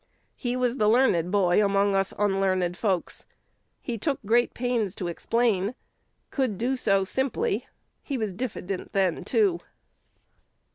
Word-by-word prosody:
He 245 -2 -2
was 250 0 0
the 210 -3 +3
learned 215 -8 +3
boy 195 0 +3
among 200 0 +2
us 195 0 +1
unlearned 195 -3 +1
folks. 190 -3 -2 0.5
He 235 -3 -5
took 280 +5 -1
great 240 +3 +2
pains 235 -6 -1
to 180 - -4
explain; 220 +3 0 0.6
could 255 -8 -1
do 240 +5 0
it 265 - 0
so 195 -5 +2
simply. 265 - -1 0.3
He 275 - -4
was 215 -5 -2
diffident 200 -4 -5
then 190 -4 +1
too." 395 -6 +2
210 Hz, 140 wpm, -26 LUFS, 195-250 Hz, 0.6 s, the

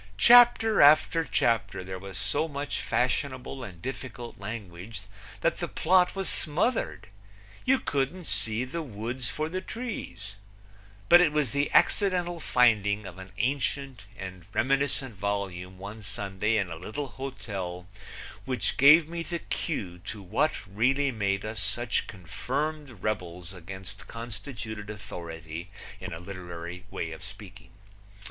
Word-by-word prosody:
Chapter 235 - +7
after 155 +3 +6
chapter 115 -9 +1
there 95 0 -6
was 95 -1 -7
so 155 +9 +1
much 145 -1 -3
fashionable 130 +2 -1
and 90 -7 -9
difficult 125 -4 -6
language 100 -1 -6 0.4
that - - +1
the - - -1
plot 180 +2 +3
was 195 -1 -2
smothered. 175 +11 +1 0.6
You 265 +1 +5
couldn't 145 - -1
see 115 -1 0
the 165 +6 -4
woods 120 -1 -4
for 155 +8 -2
the 185 +3 -3
trees, 105 - -6 0.7
But 175 +1 +9
it 165 -4 +4
was 150 -6 +1
the 140 +3 +1
accidental 180 -4 +3
finding 105 -7 +3
of 95 0 -8
an 95 0 -10
ancient 135 -3 -1
and 95 -2 -7
reminiscent 135 -3 +1
volume 95 -2 -3
one 100 +3 -8
Sunday 100 +2 -1
in 95 -4 0
a 80 - -5
little 130 - -4
hotel 100 -10 -5 0.6
which 130 -1 -1
gave 150 +4 +8
me 170 +1 -4
the 170 +1 -3
cue 95 - -3
to 105 +4 -7
what 125 - 0
really 130 +8 +2
made 100 -3 0
us 110 +1 -4
such 115 +2 0
confirmed 130 - -4
rebels 90 -4 -3
against 95 +1 -8
constituted 110 -2 -6
authority, 85 -4 -7 0.3
in 95 -1 -6
a 80 - -5
literary 90 -1 -7
way 85 - -3
of 80 +4 -9
speaking. 100 -3 -11
110 Hz, 135 wpm, -28 LUFS, 95-145 Hz, 0.7 s, But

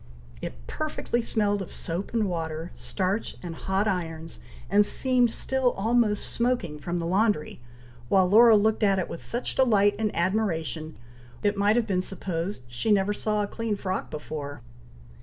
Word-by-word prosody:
It - - -7
perfectly 300 -5 -2
smelled 205 -3 0
of 190 - -7
soap 170 +4 -4
and 225 -3 +1
water, 165 -1 -4
starch 195 +3 -2
and 170 -2 -5
hot 190 +5 -1
irons, 165 -4 -3 0.3
and 205 +2 +5
seemed 250 +2 +2
still 260 +2 0
almost 220 0 +1
smoking 235 -11 0
from 175 +4 -3
the 170 - -2
laundry; 190 - +1 0.5
while 190 -2 +4
Laura 225 +4 +7
looked 220 +2 +2
at 200 -2 +3
it 185 - -1
with 170 - -6
such 240 +2 -2
delight 205 -6 +4
and 220 -1 +1
admiration, 170 -4 -1 0.5
it 205 0 +2
might 205 +2 +3
have 240 -2 +2
been 190 -4 0
supposed 185 -3 -3
she 120 - -1
never 200 0 +3
saw 210 0 0
a - - -2
clean 225 0 -2
frock 190 -1 -3
before. 150 -1 -6
200 Hz, 160 wpm, -26 LUFS, 170-220 Hz, 0.5 s, Laura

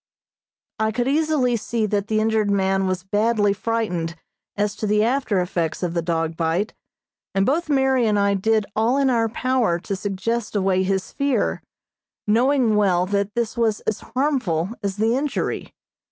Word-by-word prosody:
I 220 0 +1
could 240 +3 -1
easily 290 -4 +2
see 230 0 -1
that 205 -1 -1
the 215 0 +1
injured 220 -1 +1
man 195 -1 +1
was 185 -1 -2
badly 205 +1 +2
frightened 200 -6 -2 0.4
as 205 0 -1
to 215 - -2
the 210 +1 +3
after 235 -4 +1
effects 175 -2 -2
of 175 -2 -1
the 170 - 0
dog 165 -1 -1
bite, 170 +6 -1 0.6
and 195 0 +3
both 315 +6 0
Mary 265 -4 +3
and 210 -1 +2
I 200 0 +2
did 215 +2 +1
all 230 +5 +2
in 275 -2 +3
our 230 -2 +2
power 250 -6 +1
to 195 - -3
suggest 205 +4 -3
away 190 -2 +2
his 190 0 -1
fear, 280 -1 0 0.6
knowing 240 +1 +3
well 185 -4 +3
that 200 +1 -1
this 235 -1 -1
was 225 -3 +1
as 215 - -2
harmful 245 - -1
as 200 -2 -3
the 225 +3 +2
injury. 280 +2 -2
215 Hz, 170 wpm, -22 LUFS, 195-235 Hz, 0.6 s, the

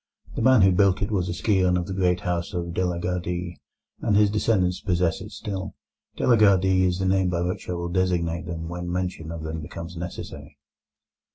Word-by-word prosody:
The - - -2
man 130 -3 +6
who 95 - +6
built 95 +1 +3
it 100 - -3
was 90 -4 0
a - - -1
scion 90 -2 +2
of 90 - -2
the 95 - -5
great 90 -1 +1
house 85 -1 -2
of 85 -1 -3
De 90 - 0
la 90 -1 -1
Gardie, 90 0 -3 0.4
and 105 - +1
his 105 -1 +4
descendants 95 -4 +1
possess 90 -3 0
it 105 - -8
still. 100 -2 -5 0.4
De - - -2
la 120 -2 +5
Gardie 95 -3 +4
is 90 -1 +1
the 95 - -1
name 95 -1 +2
by 85 -1 -1
which 90 +1 -4
I - - 0
will 85 0 -3
designate 85 -2 0
them 80 -1 -5
when 85 +1 -5
mention 90 -3 -3
of 85 -1 -6
them 80 0 -4
becomes 85 +3 -8
necessary. 75 -4 -7
90 Hz, 210 wpm, -25 LUFS, 85-95 Hz, 0.4 s, man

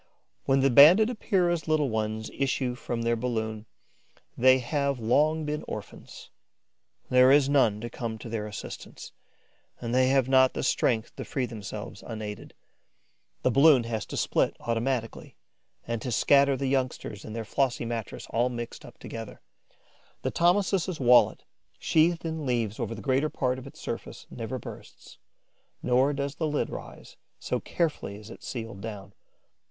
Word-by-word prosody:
When 135 0 +3
the 135 0 +3
Banded 175 - +8
Epeira's 175 -7 0
little 155 -5 +1
ones 110 0 -2
issue 135 -2 -1
from 120 -1 -4
their 115 0 +2
balloon, 110 -2 -3 0.7
they 130 +1 +6
have 140 +1 -1
long 150 +7 +2
been 150 0 -3
orphans. - - -9 0.8
There 125 +1 +6
is 140 -1 +5
none 125 -7 +3
to 120 - -4
come 115 -3 -4
to 110 - -9
their 110 -2 -3
assistance; 105 - -8 0.7
and 120 0 -4
they 130 0 +4
have 135 -1 +3
not 130 -1 +5
the - - -2
strength 120 -3 0
to - - -4
free 130 -3 -2
themselves 110 -4 -7
unaided. 105 -2 -7 0.9
The 130 - +3
balloon 140 -1 +6
has 115 -2 -4
to - - -6
split - - +1
automatically 115 0 -2 0.5
and 115 -1 -3
to 125 - -4
scatter 140 +3 +4
the 135 - -3
youngsters 130 -6 -2
and 110 - -8
their 115 -1 -4
flossy 125 +1 0
mattress 115 -3 -5
all 120 +2 +2
mixed 120 -1 -6
up - - -13
together. 115 -2 -8 0.8
The - - -1
Thomisus' 185 0 +1
wallet, 125 -2 +5 0.3
sheathed 165 +1 +2
in 160 -3 -3
leaves 115 -4 -1
over 115 - -3
the 110 - -9
greater 135 +5 +1
part 130 -2 -1
of 130 - -10
its - - -13
surface, - - -6
never 120 +2 -5
bursts; - - -12 0.6
nor 130 +3 +3
does 140 -1 -3
the 160 - -1
lid 150 -1 -1
rise, - - -10 0.2
so - - -2
carefully 155 - -2
is 105 +2 -11
it - - -11
sealed 115 -5 -6
down. 100 -3 -8
125 Hz, 160 wpm, -27 LUFS, 115-140 Hz, 0.9 s, Banded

